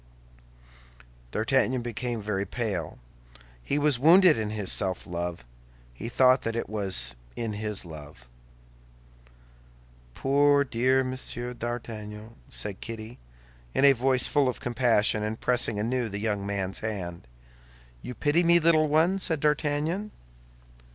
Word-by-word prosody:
D'Artagnan 125 - +1
became 120 -2 -4
very 100 -2 -1
pale; 100 -8 -3 0.6
he 140 - -1
was 145 -3 +2
wounded 170 +4 +7
in 110 -2 -3
his 105 -3 -2
self 95 -3 -1
love: 85 -5 -5 0.5
he 110 - -6
thought 130 +1 +4
that 115 0 -3
it 115 - -2
was 95 - 0 0.2
in 115 -2 -3
his 105 -2 -3
love. 75 -6 -11 1.9
"Poor 140 +1 +3
dear 130 +1 +1
Monsieur 130 -1 -3
d'Artagnan," 110 -2 -7
said 100 -2 -5
Kitty, 115 +1 -7 0.6
in 140 - +4
a 140 - +9
voice 130 0 +2
full 145 -3 +2
of 125 - -4
compassion, 120 -4 +1
and 110 +1 -3
pressing 120 -3 0
anew 120 +2 -1
the 100 - -4
young 105 -2 -2
man's 95 -2 -2
hand. 90 - -5 0.7
"You 125 - -7
pity 150 +8 +2
me, 170 0 +5
little 160 -1 +4
one?" 165 +6 +2
said 165 -5 -1
D'Artagnan. 150 +6 0
120 Hz, 130 wpm, -27 LUFS, 105-135 Hz, 1.9 s, a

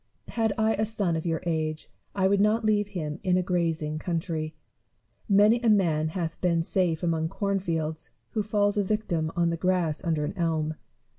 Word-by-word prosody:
Had 225 -2 +1
I 220 -1 +2
son 205 -6 0
of 160 +1 -3
your 165 0 -1
age, 155 -2 -2 0.3
I 190 -1 +3
would 200 0 +3
not 215 +2 +2
leave 210 -1 +2
him 165 -6 -4
in 180 -1 +2
a 185 - +1
grazing 165 -4 -1
country. 160 -2 -3 0.7
Many 210 +4 +5
a 235 - +3
man 165 -7 +3
hath 165 0 -4
been 170 -2 +2
safe 175 -2 0
among 160 -2 0
corn 200 +2 -1
fields, 160 -3 -3 0.2
who 220 - 0
falls 205 0 +1
a 205 - +3
victim 180 -6 -1
on 170 -1 +2
the 170 - -2
grass 175 -2 0
under 160 -4 0
an - - -4
elm. 160 -2 0
175 Hz, 180 wpm, -27 LUFS, 160-205 Hz, 0.7 s, Many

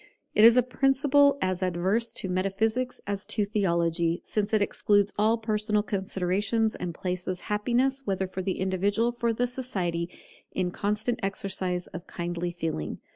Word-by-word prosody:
It 210 - +5
is 230 +2 +9
a 250 - +6
principle 275 +2 +3
as 185 0 -1
adverse 185 +6 0
to - - 0
metaphysics 220 +7 -1
as 200 0 -3
to 210 - 0
theology, 170 -4 +1
since 210 -1 -1
it 215 - +4
excludes 205 0 +2
all 220 +2 +3
personal 215 -1 0
considerations, 200 +3 0
and 180 -1 -4
places 180 0 -3
happiness, 245 +6 0
whether 190 -4 -1
for 185 0 -5
the 190 0 -2
individual 200 +5 +1
or 235 -1 -1
for 245 - +1
society, 185 -10 -3 0.4
in 180 -1 -1
constant 210 +5 -1
exercise 190 -2 -2
of 175 0 -9
kindly 175 0 -3
feeling. 165 - -3
200 Hz, 150 wpm, -27 LUFS, 180-225 Hz, 0.4 s, is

